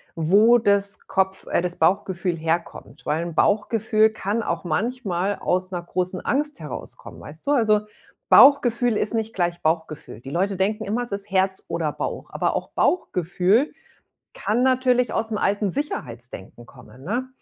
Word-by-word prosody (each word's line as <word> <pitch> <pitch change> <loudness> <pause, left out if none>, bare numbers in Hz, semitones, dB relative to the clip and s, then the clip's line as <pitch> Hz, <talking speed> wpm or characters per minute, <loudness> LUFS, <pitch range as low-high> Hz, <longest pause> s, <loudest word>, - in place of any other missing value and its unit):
wo 205 +9 +5
das 200 -3 0
Kopf 190 0 -1
äh, - - +1
das 180 -1 -3
Bauchgefühl 185 -2 +1
herkommt. 165 +1 -4
Weil 155 +2 0
'n 170 -2 -6
Bauchgefühl 220 +2 +2
kann 220 +1 -2
auch - - -3
manchmal 195 +1 -1
aus 185 +1 -1
'ner 175 -1 -4
großen 185 +1 -2
Angst 295 - -1
herauskommen, 150 - -9
weißt 155 +2 -10
du? 285 - +3
Also, 215 -6 +3 0.5
Bauchgefühl 245 -4 +6
ist 210 - -2
nicht 225 0 -2
gleich 175 -1 -1
Bauchgefühl. 155 -7 -3
Die 135 - -9
Leute 195 +4 0
denken 200 +3 -1
immer, 225 +5 -1
es 240 - -10
ist 200 +1 -3
Herz 190 0 0
oder 165 -2 -2
Bauch, - - -5
aber - - -1
auch - - -3
Bauchgefühl 190 - +1 0.6
kann 230 +4 0
natürlich 255 -2 +2
aus 225 0 -1
'm - - 0
alten 205 0 0
Sicherheitsdenken 120 - -6
kommen, 130 0 -16
ne? 240 - -2
195 Hz, 160 wpm, -23 LUFS, 175-225 Hz, 0.6 s, Bauchgefühl